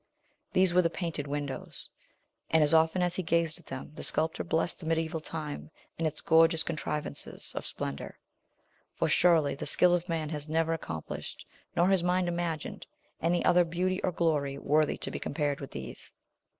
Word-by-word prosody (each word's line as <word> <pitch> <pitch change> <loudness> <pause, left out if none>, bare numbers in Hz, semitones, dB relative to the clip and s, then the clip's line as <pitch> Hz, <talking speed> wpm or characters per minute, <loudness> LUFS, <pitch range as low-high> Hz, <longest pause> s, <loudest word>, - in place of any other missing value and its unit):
These 185 -1 +3
were 180 - +6
the 165 - +2
painted 165 -6 -3
windows; 145 -1 -4 0.6
and 160 -1 +5
as 150 +2 +2
often 160 +3 +4
as 175 -1 +1
he 185 - 0
gazed 170 -1 0
at 175 - -20
them 130 +2 -7
the - - -8
sculptor 160 +1 0
blessed 165 +2 0
the 160 - -7
medieval 160 0 0
time, 155 -2 -5 0.3
and 165 - +2
its 155 - -4
gorgeous 165 0 +5
contrivances 150 - -4
of - - -4
splendor; 70 0 -5 0.8
for - - +1
surely 160 -5 +4
the 140 - -4
skill 175 +4 +6
of 175 0 0
man 160 -2 -1
has 150 -1 -5
never 165 +1 +1
accomplished, 80 - -6 0.3
nor 175 +2 +4
his 190 -2 +4
mind 180 +1 +1
imagined, 170 -2 -3 0.3
any 170 +2 +1
other 180 0 +6
beauty 180 +3 -1
or 185 - +1
glory 150 -5 0
worthy 150 +2 +2
to - - -4
be - - -4
compared 145 -1 -1
with 135 - -6
these. 65 -1 -7
160 Hz, 175 wpm, -30 LUFS, 150-175 Hz, 0.8 s, were